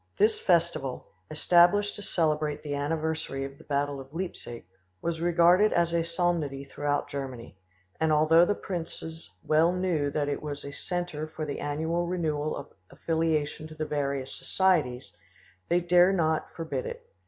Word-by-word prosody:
This 215 +1 +3
festival, 170 -7 +1 0.2
established 175 +6 +4
to - - -8
celebrate 155 -5 0
the 145 -2 -3
anniversary 155 -1 -2
of 135 0 -10
the - - -14
battle 145 -1 -1
of 135 +1 -14
Leipzig, 165 - -5 0.3
was 165 -1 -3
regarded 175 +4 +5
as 170 -1 +2
a 170 -1 +2
solemnity 165 -5 -1
throughout 145 0 -1
Germany, 130 - -6 0.4
and 160 -1 +2
although 155 +2 +6
the 205 +4 +2
princes 165 -3 -6
well 160 +3 +4
knew 180 -6 0
that 145 0 -1
it 145 - -2
was 145 -2 -6
a 140 - -6
centre 175 -2 -3
for 155 0 -5
the 145 - -4
annual 160 +4 -1
renewal 155 -4 -1
of 140 - -9 0.2
affiliation 160 -2 -1
to 155 - -11
the 155 0 -3
various 140 -3 -2
societies, 155 -10 0 0.6
they 175 - +4
dared 180 +2 +5
not 160 -3 0
forbid 165 - -3
it. 475 0 -7
160 Hz, 155 wpm, -28 LUFS, 145-175 Hz, 0.6 s, although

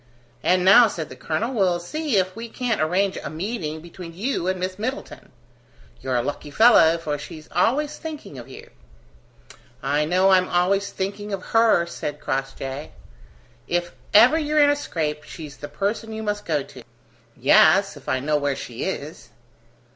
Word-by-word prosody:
"And 180 0 +2
now," 225 +5 +8
said 165 -6 -5
the - - -10
colonel, 220 +11 -2
"we'll 185 -6 +2
see 285 - -2
if 185 -1 0
we 230 +1 -7
can't 235 -4 -2
arrange 185 +5 +1
a - - -4
meeting 160 -2 -4
between 170 0 -10
you 205 -2 -2
and 185 0 -1
Miss 185 +1 -4
Middleton. 255 +6 -5 0.7
You're 130 -1 -2
a 120 - +1
lucky 145 +2 -5
fellow, 170 -4 +6
for 150 -3 -4
she's 155 +1 -10
always 270 - +1
thinking 300 - -8
of 120 - -11
you." - - -12 1.1
"I 145 +2 +1
know 185 +4 +3
I'm 185 -1 +4
always 195 +3 +1
thinking 205 +2 -4
of 190 -2 -4
her," 225 -6 +4
said 150 -3 -6
Crossjay. 135 +1 -4 0.7
"If 175 0 -1 0.2
ever 250 +10 +6
you're 305 0 -1
in 290 -1 +6
a - - +2
scrape, 155 - -3
she's 155 -2 -10
the 145 - -8
person 210 +7 -3
you 220 0 -5
must 210 -1 -3
go 150 -4 0
to." - - -13 0.6
"Yes, - - +5
if - - -10
I 130 - +1
know 150 +3 0
where 145 -1 -1
she 120 -3 -6
is!" - - -6
180 Hz, 170 wpm, -23 LUFS, 155-220 Hz, 1.1 s, now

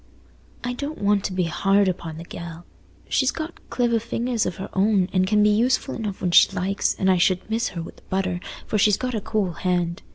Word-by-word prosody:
"I 245 +1 -2
don't 285 +5 -5
want 205 -1 +2
to - - -1
be 185 0 0
hard 195 +4 +2
upo' 175 -3 -3
the 160 +2 -8
gell. 170 0 -9 0.4
She's 265 - +2
got 320 +3 -5
cliver 235 -2 +1
fingers 235 0 -1
of 180 - -3
her 190 - -7
own, 195 -1 +3
and 185 0 +2
can 210 +1 +3
be 210 - +5
useful 240 +5 +1
enough 210 -4 -4
when 180 - +1
she - - +7
likes 195 +2 0
and 190 - 0
I 185 -1 +5
should 180 +1 +2
miss 230 +1 +1
her 165 - -3
wi' - - -8
the - - -20
butter, 185 -2 -1 0.3
for 215 - -1
she's 210 -1 +4
got 255 -1 -3
a 220 - -2
cool 215 -3 -1
hand. 175 -1 -1
195 Hz, 225 wpm, -23 LUFS, 180-225 Hz, 0.4 s, she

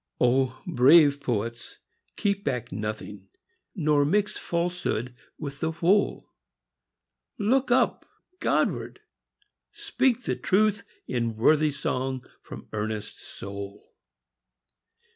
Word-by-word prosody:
O 130 +1 +2
brave 145 -2 +6
poets, 115 -2 -3 0.4
keep 200 -1 0
back 125 -3 -2
nothing; 105 -1 -5 0.5
Nor 150 -5 +3
mix 200 +8 +1
falsehood 170 -9 -2 0.2
with 140 -2 -6
the 160 0 -1
whole! 185 +5 +1 1.1
Look 255 +5 +2
up 245 - +2 0.3
Godward! - - 0 0.7
speak 255 -2 0
the - - -1
truth 210 +1 +1 0.2
in 115 -2 -2
Worthy 150 +7 +4
song 130 -2 -3 0.2
from - - -10
earnest 105 0 -4
soul 100 +1 -9
140 Hz, 95 wpm, -26 LUFS, 115-180 Hz, 1.1 s, brave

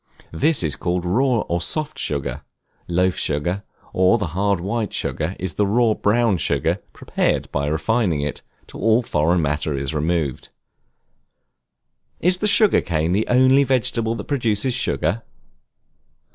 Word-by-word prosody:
This 130 - +2
is 75 -3 0
called 90 0 -2
raw 120 +5 +2
or 85 0 -2
soft 155 - -1
sugar: 70 -2 -3 0.5
loaf 90 +1 +1
sugar, 85 +7 -1 0.3
or 95 +5 +4
the 100 -7 -3
hard 100 0 +1
white 105 +4 -3
sugar, 80 +4 -2
is 95 -3 -4
the 105 +4 +1
raw 115 +2 +3
brown 110 -1 +2
sugar, 80 - 0
prepared - - -1
by 70 0 -1
refining 85 +2 0
it 75 0 -4 0.2
till - - -10
all 115 +4 +3
foreign 85 -3 +1
matter 75 0 -1
is 70 +2 -3
removed. 75 -3 -1 1.7
Is 180 +1 +1
the 210 - +1
Sugar 210 0 +4
Cane 80 -1 -1
the 105 +4 +1
only 130 +2 +5
vegetable 115 -3 0
that 105 - -5
produces 120 -2 0
Sugar? 90 - -1
95 Hz, 145 wpm, -21 LUFS, 80-120 Hz, 1.7 s, only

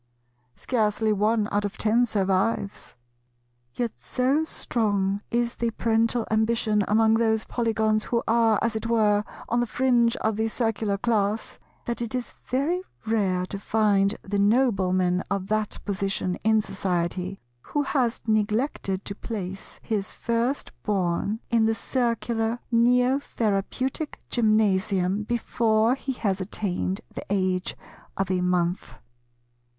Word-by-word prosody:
Scarcely 220 -2 +1
one 210 +1 +2
out 205 0 +1
of 205 - -4
ten 230 +3 +3
survives. 200 0 0 0.8
Yet 240 -2 -3
so 270 +5 +1
strong 205 -8 0
is 235 0 0
the 235 - -1
parental 230 +1 +1
ambition 220 -1 +2
among 220 +1 +4
those 225 -1 +2
Polygons 220 -2 0
who 235 -1 0
are, 225 -1 +4
as 230 -1 0
it 220 +1 -2
were, 210 -3 +3 0.2
on 240 - +1
the 240 - +1
fringe 240 -2 +2
of 220 -1 -1
the 220 0 +1
Circular 220 -3 -1
class, 215 -1 -1 0.3
that 235 0 -3
it 235 +1 -3
is 250 -1 -4
very 290 +8 0 0.2
rare 195 -5 +1
to 195 +2 -6
find 205 -1 +2
the 200 +1 -2
Nobleman 190 -5 +2
of 195 -1 -2
that 215 -1 0
position 195 -2 -1
in 220 -1 +3
society, 185 -1 -2 0.2
who 290 - -1
has 255 -4 0
neglected 215 -2 0
to 200 - -4
place 195 -3 -6
his 210 -3 -2
first 235 +4 -1
born 200 +2 -1
in 230 -2 +4
the 225 - +1
Circular 230 -1 -1
Neo 250 +3 +4
Therapeutic 255 +5 -2
Gymnasium 205 -4 +2
before 230 0 +2
he 270 0 -3
has 200 -5 -1
attained 190 -1 -2
the - - -5
age 185 -2 0 0.4
of 195 -1 -1
a 180 -1 +1
month. 180 0 0
220 Hz, 130 wpm, -25 LUFS, 200-235 Hz, 0.8 s, among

